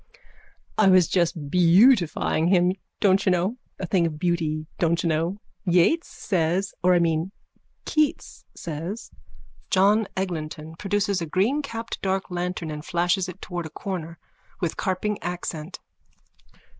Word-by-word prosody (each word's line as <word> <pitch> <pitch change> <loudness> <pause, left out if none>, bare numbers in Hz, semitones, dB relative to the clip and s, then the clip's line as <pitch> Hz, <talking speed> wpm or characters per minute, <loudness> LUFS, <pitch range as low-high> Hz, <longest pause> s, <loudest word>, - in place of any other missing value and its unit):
_ - - -22 0.6
I 215 - +6
was 185 -2 +6
just 165 -5 0
beautifying 175 - +4
him, 180 0 +4 0.3
don't 195 -1 +4
you 190 - +3
know. 180 +7 0 0.2
A 185 - -2
thing 175 -1 +2
of 155 -2 -5
beauty, 155 -2 -1
don't 170 0 +1
you - - +1
know, 165 +4 0 0.3
Yeats 180 - +3
says, 185 0 -1
or 180 0 +4
I - - +5
mean, 165 +2 0 0.5
Keats 305 -2 -1
says. 170 +7 -6 0.6
JOHN 205 +3 +4
EGLINTON: 160 -4 -4
_(Produces 200 -1 0
a 165 - -3
greencapped 230 - -1
dark 190 -1 -1
lantern 180 -2 -3
and 150 0 -6
flashes 175 +2 0
it 185 +2 -10
towards 175 -3 -4
a - - -12
corner: 170 -1 -5 0.4
with 170 -4 -1
carping 195 +2 -2
accent.) 175 -2 -5
180 Hz, 140 wpm, -25 LUFS, 165-195 Hz, 0.6 s, I